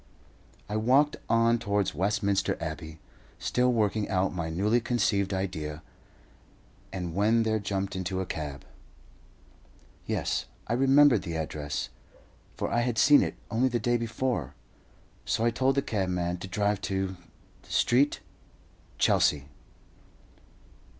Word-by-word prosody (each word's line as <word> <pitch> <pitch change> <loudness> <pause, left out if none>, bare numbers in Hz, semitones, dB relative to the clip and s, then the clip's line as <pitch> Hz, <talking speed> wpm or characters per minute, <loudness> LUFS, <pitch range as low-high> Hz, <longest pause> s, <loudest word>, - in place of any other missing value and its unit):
I 105 +1 -2
walked 135 +7 +3
on 115 +1 +3
towards 100 -3 0
Westminster 100 +3 0
Abbey, 80 -1 -6 0.4
still 125 0 +1
working 110 -2 0
out 95 -1 +1
my 85 -3 -3
newly 105 +8 +1
conceived 105 -5 +1
idea, 80 -5 -3 1.1
and 90 -3 -4
when 110 +5 +3
there 110 -1 +1
jumped 100 -1 -3
into 95 0 -2
a 95 - -2
cab. 75 -5 -6 1.4
Yes, - - -1 0.2
I - - -2
remembered 135 -2 +5
the 85 -2 -5
address, 75 -2 -3 0.7
for - - -2
I 120 - +2
had 120 -1 -1
seen 145 +3 +7
it - - -2 0.2
only 120 +3 +2
the 120 -1 -1
day 120 +2 +1
before, 115 - -2 0.7
so 115 - 0
I 120 - +3
told 130 +3 +1
the 140 - +1
cabman 90 -4 -1
to 95 - -7
drive 100 +1 0
to 95 -1 -1 0.5
Street, 135 +4 +2 0.8
Chelsea. 70 -1 +2
100 Hz, 125 wpm, -28 LUFS, 90-115 Hz, 1.4 s, seen